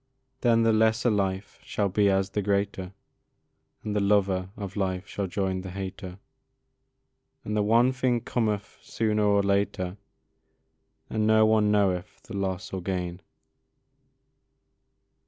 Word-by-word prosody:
Then 115 -2 +3
the 115 0 +4
lesser 110 +2 +3
life 95 -1 -2
shall 100 - -1
be 100 +1 +2
as 95 0 +1
the 105 - -1
greater, 100 -2 -1 0.9
And 105 -1 -3
the - - +2
lover 100 -2 +2
of 100 -3 -6
life 95 -2 -2
shall 100 -1 -3
join 95 0 -2
the 95 - -7
hater, 95 0 -6 1.3
And 105 - -2
the 105 - +2
one 115 +5 +4
thing 125 -2 0
cometh 105 -5 -2
sooner 110 -1 -1
or 100 -1 +3
later, 100 -1 0 1.1
And 110 -1 0
no 110 0 +5
one 110 -1 +3
knoweth 95 -4 0
the 115 -5 -9
loss 95 -2 -3
or 95 - -3
gain. 90 -1 -3
100 Hz, 135 wpm, -27 LUFS, 95-110 Hz, 1.3 s, no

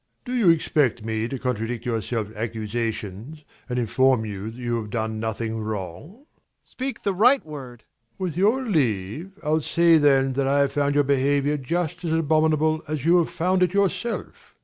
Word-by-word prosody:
ABBÉ. - - -48
Do 250 - -4
you 230 -8 +4
expect 145 -8 +2
me 110 0 -1
to 135 - -4
contradict 120 -2 -3
your 115 -2 -1
self 110 0 -4
accusations 110 +4 -4 0.3
and 125 - -2
inform 125 0 +2
you 105 0 -5
that 115 - -11
you 120 -1 -2
have 105 - -8
done 110 -1 -2
nothing 110 0 -3
wrong? 105 - -5
MAURICE. 265 +6 -23 0.4
Speak 265 +1 -6
the 200 - +1
right 245 +6 +4
word! 130 -6 -9
ABBÉ. 115 -1 -47
With 180 -5 -3
your 220 +9 +2
leave, 140 - -1
I'll 155 +1 +1
say 170 +1 +4
then 135 -2 +3
that 135 +1 0
I 140 +1 +3
have 140 - +1
found 145 0 +1
your 145 - +4
behaviour 140 +1 +1
just 170 +5 -3
as 165 -2 -1
abominable 155 0 +2
as 150 -2 -3
you 170 +2 +5
have 170 - 0
found 185 +2 0
it 180 +1 +2
yourself. 200 +4 -2
140 Hz, 190 wpm, -24 LUFS, 115-165 Hz, 0.4 s, you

